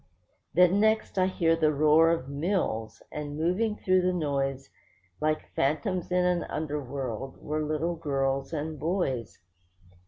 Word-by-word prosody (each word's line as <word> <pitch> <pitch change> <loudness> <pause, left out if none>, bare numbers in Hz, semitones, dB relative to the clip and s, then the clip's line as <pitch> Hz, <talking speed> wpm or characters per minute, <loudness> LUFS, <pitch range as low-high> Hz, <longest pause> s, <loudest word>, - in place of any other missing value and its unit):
Then 180 +3 +5
next 220 -2 +2
I 185 - +4
heard 165 -3 +1
the 155 -1 +4
roar 155 +2 +5
of 165 -6 0
mills; 140 - -2
and 145 -1 -5
moving 185 +7 +1
through 185 -2 +2
the 180 0 +2
noise, 135 -5 -2 0.5
Like 155 0 -1
phantoms 175 +6 0
in 180 0 +3
an 180 -1 +1
underworld, 135 -4 -4
were 155 +1 -2
little 155 +3 -1
girls 135 -3 -1
and 155 -1 -4
boys. 150 - -1
155 Hz, 135 wpm, -28 LUFS, 140-180 Hz, 0.5 s, Then